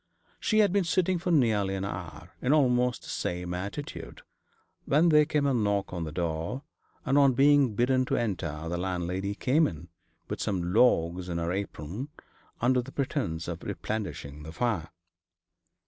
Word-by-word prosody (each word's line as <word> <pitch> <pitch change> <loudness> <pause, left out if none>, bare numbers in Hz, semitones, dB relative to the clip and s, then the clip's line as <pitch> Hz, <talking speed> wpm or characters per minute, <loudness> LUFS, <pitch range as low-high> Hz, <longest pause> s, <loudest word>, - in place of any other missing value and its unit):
She 215 - +1
had 205 -3 +3
been 200 -1 +3
sitting 180 +1 +1
for 180 +2 -3
nearly 110 - +2
an 95 0 -3
hour 85 -3 -7
in 130 +3 +2
almost 125 -4 +2
the - - -10
same 90 0 -3
attitude, 100 +11 -6 0.6
when 155 +5 +4
there 150 -1 +6
came 150 -2 0
a 140 - +2
knock 100 -5 0
at 85 -2 -3
the 80 - -5
door, 85 - -3 0.4
and, 135 +2 +3
on 140 -2 +5
being 140 -3 +4
bidden 130 +3 +2
to - - 0
enter, 85 -8 -2
the 85 +1 -2
landlady 90 +2 -2
came 150 +8 +3
in, 80 +1 -8 0.4
with - - -4
some 90 -3 -1
logs 90 -6 +3
in 85 - -2
her 85 0 -1
apron, 100 - -4 0.5
under 125 +1 +3
pretence 125 - -3
of 85 -1 -5
replenishing 75 -9 -5
the 80 +1 -8
fire. 90 -4 -1
100 Hz, 165 wpm, -28 LUFS, 85-135 Hz, 0.6 s, there